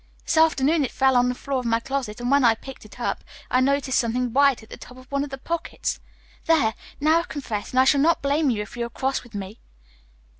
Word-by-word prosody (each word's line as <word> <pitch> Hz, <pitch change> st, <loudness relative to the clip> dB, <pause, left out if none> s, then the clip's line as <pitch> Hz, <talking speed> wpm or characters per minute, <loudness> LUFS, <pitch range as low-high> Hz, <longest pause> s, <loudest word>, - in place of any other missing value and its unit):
This -, -, 0 dB
afternoon 315 Hz, -1 st, +3 dB
it 260 Hz, -, -1 dB
fell 265 Hz, -1 st, +2 dB
on 245 Hz, 0 st, +4 dB
the 250 Hz, -, -2 dB
floor 275 Hz, +1 st, -3 dB
of 250 Hz, -, -6 dB
my 230 Hz, 0 st, +2 dB
closet, 255 Hz, -4 st, -4 dB
and 245 Hz, +2 st, -2 dB
when 280 Hz, -1 st, +4 dB
I 230 Hz, -2 st, +5 dB
picked 265 Hz, 0 st, -11 dB
it 215 Hz, -, -14 dB
up -, -, -2 dB, 0.3 s
I 255 Hz, -, +3 dB
noticed 270 Hz, -1 st, +1 dB
something 245 Hz, 0 st, -1 dB
white 275 Hz, -3 st, +3 dB
at 220 Hz, -, -17 dB
the -, -, -6 dB
top 250 Hz, -, -13 dB
of 255 Hz, -, -14 dB
one 280 Hz, 0 st, 0 dB
of 290 Hz, -, -6 dB
the 270 Hz, -, -6 dB
pockets. 335 Hz, +5 st, -3 dB, 0.5 s
There! 290 Hz, -10 st, +3 dB, 0.3 s
Now 310 Hz, +3 st, +4 dB
I've 340 Hz, -, -6 dB
confessed 225 Hz, -8 st, -5 dB
and 255 Hz, -, +3 dB
I -, -, +7 dB
shall 275 Hz, +1 st, +4 dB
not 330 Hz, +3 st, +3 dB
blame 285 Hz, +1 st, +2 dB
you 215 Hz, -4 st, -1 dB
if 210 Hz, -, -12 dB
you 240 Hz, -, -3 dB
are 235 Hz, -, -4 dB
cross 265 Hz, +3 st, -2 dB
with 240 Hz, -3 st, -15 dB
me. 200 Hz, +2 st, -7 dB
265 Hz, 255 wpm, -24 LUFS, 240-280 Hz, 0.5 s, I